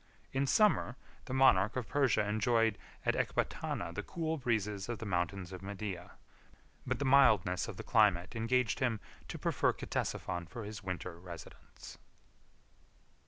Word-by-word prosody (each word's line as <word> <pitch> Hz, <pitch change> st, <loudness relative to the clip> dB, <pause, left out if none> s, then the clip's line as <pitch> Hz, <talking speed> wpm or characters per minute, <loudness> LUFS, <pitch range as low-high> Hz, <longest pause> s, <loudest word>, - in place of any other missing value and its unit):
In 135 Hz, +1 st, +1 dB
summer, 205 Hz, -, +3 dB, 0.3 s
the 130 Hz, -, -5 dB
monarch 105 Hz, -6 st, +5 dB
of 125 Hz, -3 st, -2 dB
Persia 130 Hz, -7 st, +2 dB
enjoyed 110 Hz, +1 st, +2 dB, 0.3 s
at -, -, +3 dB
Ecbatana 85 Hz, -, -2 dB
the 105 Hz, -, -3 dB
cool 160 Hz, +8 st, -3 dB
breezes 105 Hz, -4 st, -1 dB
of 120 Hz, -, -2 dB
the 115 Hz, -, -7 dB
mountains 90 Hz, 0 st, -2 dB
of 95 Hz, -, -7 dB
Media; 95 Hz, -2 st, -6 dB, 0.7 s
but -, -, 0 dB
the 140 Hz, -, -2 dB
mildness 110 Hz, -10 st, +4 dB
of 110 Hz, -6 st, -7 dB
the -, -, -6 dB
climate 105 Hz, -3 st, +3 dB
engaged 115 Hz, +1 st, +1 dB
him 120 Hz, -5 st, +1 dB, 0.3 s
to -, -, -6 dB
prefer -, -, +1 dB
Ctesiphon 85 Hz, -1 st, -3 dB
for 115 Hz, 0 st, -6 dB
his 105 Hz, 0 st, -7 dB
winter 90 Hz, -3 st, -5 dB
residence. 85 Hz, -2 st, -11 dB
105 Hz, 145 wpm, -33 LUFS, 95-125 Hz, 0.7 s, monarch